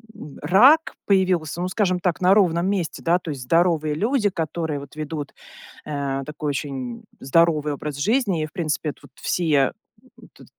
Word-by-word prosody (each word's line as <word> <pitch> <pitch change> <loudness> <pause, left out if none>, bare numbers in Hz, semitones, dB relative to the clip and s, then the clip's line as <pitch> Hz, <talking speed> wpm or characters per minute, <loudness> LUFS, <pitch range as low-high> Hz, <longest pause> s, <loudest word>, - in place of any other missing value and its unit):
м, 150 -9 -11
рак 250 - +5
появился, 185 -5 +1
ну, 180 - -1
скажем 185 -1 0
так, 180 0 -1
на 185 +1 +5
ровном 180 -3 +3
месте, 195 -5 -2
да? 170 +2 +3
То 170 - -6
есть 140 -3 -6
здоровые 160 +1 +2
люди, 220 - +1
которые 160 -3 -3
вот 140 +1 -12
ведут, 150 -1 -5 0.5
э, 140 -2 -3
такой 150 +1 -4
очень 135 -4 -4 0.2
здоровый 150 +1 +2
образ 145 0 -5
жизни. 200 - +1
И, - - -1
в 155 - -13
принципе, 155 -3 -2
эт - - -19
вот - - -16
все 175 - -2 0.2
эт - - -4 0.6
т - - -15
165 Hz, 175 wpm, -23 LUFS, 150-185 Hz, 0.6 s, рак